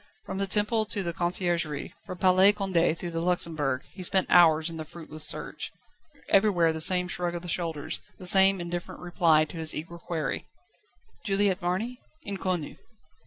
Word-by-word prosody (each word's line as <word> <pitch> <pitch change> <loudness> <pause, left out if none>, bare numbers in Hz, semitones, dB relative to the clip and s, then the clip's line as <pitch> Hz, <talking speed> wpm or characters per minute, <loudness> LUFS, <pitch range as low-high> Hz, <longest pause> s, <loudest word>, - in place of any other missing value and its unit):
From 190 - -6
the 195 - 0
Temple 210 +2 +1
to 205 -2 -1
the 170 -1 -4
Conciergerie, 175 -4 -2
from 180 - -7
Palais 185 +2 +5
Condé 185 -5 0
to 175 0 -5
the 165 - -3
Luxembourg, 160 -6 0
he 190 - -10
spent 185 +1 +3
hours 160 -2 +5
in 165 -1 -6
the 160 - -5
fruitless 155 -1 -6
search. - - 0 0.6
Everywhere 185 -5 +2
the 160 - +3
same 180 +2 +5
shrug 175 -1 -2
of 170 - -6
the - - -8
shoulders, 165 -3 -2 0.2
the 185 - -11
same 190 +1 +7
indifferent 175 0 -6
reply 170 -3 +2
to 160 - -11
his 160 -1 -3
eager 170 +2 -7
query: 160 -5 -4 0.8
"Juliette 200 -2 0
Marny? 205 +8 -3 0.2
_Inconnue. 185 -5 -4
175 Hz, 165 wpm, -26 LUFS, 165-190 Hz, 0.8 s, same